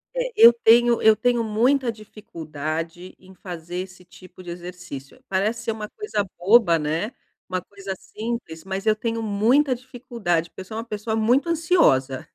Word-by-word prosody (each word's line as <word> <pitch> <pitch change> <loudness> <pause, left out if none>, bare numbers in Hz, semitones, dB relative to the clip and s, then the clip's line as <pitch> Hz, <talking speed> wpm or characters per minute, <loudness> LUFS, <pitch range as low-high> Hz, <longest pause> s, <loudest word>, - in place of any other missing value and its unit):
É, - - -1
eu 230 +1 +9
tenho 235 0 +4
eu 220 0 +6
tenho 240 0 +1
muita 240 +4 +2
dificuldade 165 -5 -7
em 190 0 -17
fazer 175 -1 -7
esse 185 0 -7
tipo 185 +1 -15
de 175 - -10
exercício. 175 -5 -9
Parece 215 +4 0
ser 230 - -1
uma 215 -1 -5
coisa 210 - -3
boba, 180 -2 +4
né, 160 +9 -2 0.3
uma 185 0 -2
coisa 195 +1 -7
simples, 220 -9 -6
mas 190 +1 -5
eu 215 -1 +4
tenho 230 +1 -3
muita 235 +7 +2
dificuldade, 235 -9 -3
porque - - -10
eu - - -9
sou 220 +4 -7
uma 225 - -3
pessoa 220 0 -3
muito 240 +8 +2
ansiosa. 315 - +2
210 Hz, 165 wpm, -23 LUFS, 180-235 Hz, 0.3 s, eu